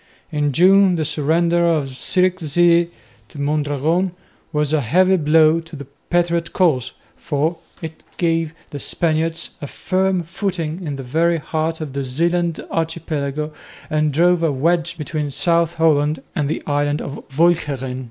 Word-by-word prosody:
In 150 -2 0
June 190 +4 +5
the 160 -2 -1
surrender 165 +3 +1
of 155 -5 +1
Zierikzee 175 +2 +2 0.4
to 145 - -11
Mondragon 150 +5 0 0.4
was 150 0 +1
a 155 - +3
heavy 185 +10 +3
blow 160 0 +4
to 165 -1 -11
the 140 -1 -8 0.2
patriot 170 -1 0
cause, 155 -10 +1 0.2
for 155 +3 -2 0.2
it 160 0 -7 0.2
gave 165 -2 0 0.2
the 145 - -5
Spaniards 165 +2 0
a 145 - -5
firm 185 +3 0
footing 170 -1 -4
in 145 - -3
the 135 - -6
very 165 +6 +1
heart 160 +1 -2
of 150 -4 -5
the 140 0 -2
Zeeland 170 +5 0
archipelago 155 -2 -2 0.4
and 155 0 +1
drove 175 +4 +3
a 165 -2 +2
wedge 165 +4 0
between 150 -1 -3
South 170 +2 +1
Holland 155 -2 +2
and 150 -4 0
the - - -3
island 145 0 0
of 140 - -7
Walcheren. 140 -6 +1
160 Hz, 145 wpm, -20 LUFS, 145-170 Hz, 0.4 s, June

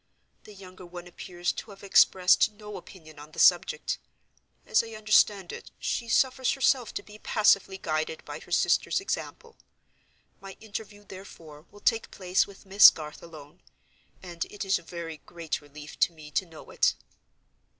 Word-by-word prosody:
The 210 - -13
younger 185 -1 -13
one 175 0 -10
appears 175 0 -4
to - - -8
have 195 -1 -13
expressed 190 +1 +4
no 210 0 -10
opinion 155 -5 -12
on 150 +1 -13
the - - -14
subject. - - +3 0.7
As - - +3
I 225 -1 -10
understand 210 -3 +3
it, - - -9
she 235 - -3
suffers 260 +1 +2
herself 265 -3 +1
to - - -4
be 210 0 -14
passively 200 -3 +2
guided 155 -2 -3
by - - -7
her - - -16
sister's - - +2
example. 455 +3 -5 0.8
My 195 -1 -11
interview, 205 -1 -8
therefore, 165 -6 -13
will 205 - -17
take 225 - +1
place 185 -1 0
with 200 0 -15
Miss 195 +1 +9
Garth 150 -1 -9
alone—and 170 +2 -11
it 205 -1 -7
is 195 0 +2
a - - -15
very 165 -1 -7
great 170 -3 -4
relief 150 +1 -12
to 185 - +3
me 155 -2 -13
to 185 +6 -1
know 160 -2 -13
it." - - +2
190 Hz, 160 wpm, -27 LUFS, 165-210 Hz, 0.8 s, Miss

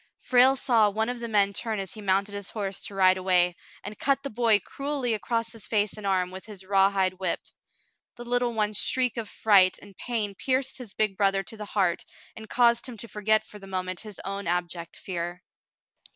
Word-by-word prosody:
Frale 255 +1 +5
saw 230 -5 +3
one 220 +3 -1
of 245 -1 -4
the 235 - -4
men 200 -2 +2
turn 220 +1 -2
as 195 +2 -5
he 215 - -9
mounted 200 +1 +1
his 200 -1 -5
horse 200 -3 -4
to 200 - -7
ride 185 -1 +5
away, 180 -1 +3 0.3
and 205 +2 -8
cut 275 0 +1
the 275 - -4
boy 225 -1 +4
cruelly 275 +1 -3
across 230 +1 -2
his 225 -2 -9
face 210 -2 +1
and 210 -2 -6
arm 185 -2 +1
with 190 0 -8
his 205 -3 -9
rawhide 195 -1 +2
whip. 185 -3 -1 0.7
The 240 - -9
little 245 0 +1
one's 210 -2 0
shriek 255 -2 +2
of 225 -3 -4
fright 195 -4 +4
and 200 -1 -15
pain 220 -3 -2
pierced 265 +5 -1
his 230 -5 -9
big 210 -3 0
brother 195 -1 +2
to 225 - -9
the 210 -1 -7
heart 190 -4 0 0.3
and 220 -1 -10
caused 235 0 +3
him 235 - -9
to 230 - -6
forget 215 0 +1
for 210 - -11
the 195 - -11
moment 185 -1 -3
his 210 -3 -9
own 195 -1 -4
abject 175 -1 -3
fear. 175 -1 -5
205 Hz, 210 wpm, -27 LUFS, 190-230 Hz, 0.7 s, Frale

